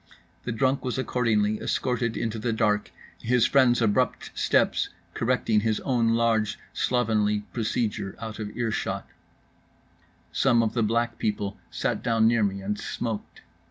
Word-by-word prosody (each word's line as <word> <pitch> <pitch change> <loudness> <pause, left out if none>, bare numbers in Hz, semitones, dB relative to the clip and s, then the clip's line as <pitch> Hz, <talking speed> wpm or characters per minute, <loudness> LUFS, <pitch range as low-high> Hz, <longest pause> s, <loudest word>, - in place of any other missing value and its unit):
The - - -2
drunk 130 +4 +1
was 125 -1 -2
accordingly 110 -5 +1
escorted 125 -3 -1
into 115 -1 -2
the 115 +2 -1
dark, 105 -2 +1 0.3
his 125 0 +3
friends' 125 -3 +4
abrupt 105 -2 +1
steps - - +2 0.2
correcting 115 -2 +1
his 110 0 0
own 115 -3 +2
large 115 -2 +1 0.2
slovenly 110 -4 +1
procedure 110 -4 -2
out 110 -1 -6
of 105 -1 -4
earshot…. 115 -3 -2 1.2
Some 120 -3 +3
of 110 - -1
the 120 - +1
Black 115 +1 0
People 105 -2 -2
sat - - -2
down 115 -1 +3
near 115 0 +3
me 100 -1 -1
and 105 +1 -2
smoked. 115 -3 -5
115 Hz, 140 wpm, -26 LUFS, 105-120 Hz, 1.2 s, friends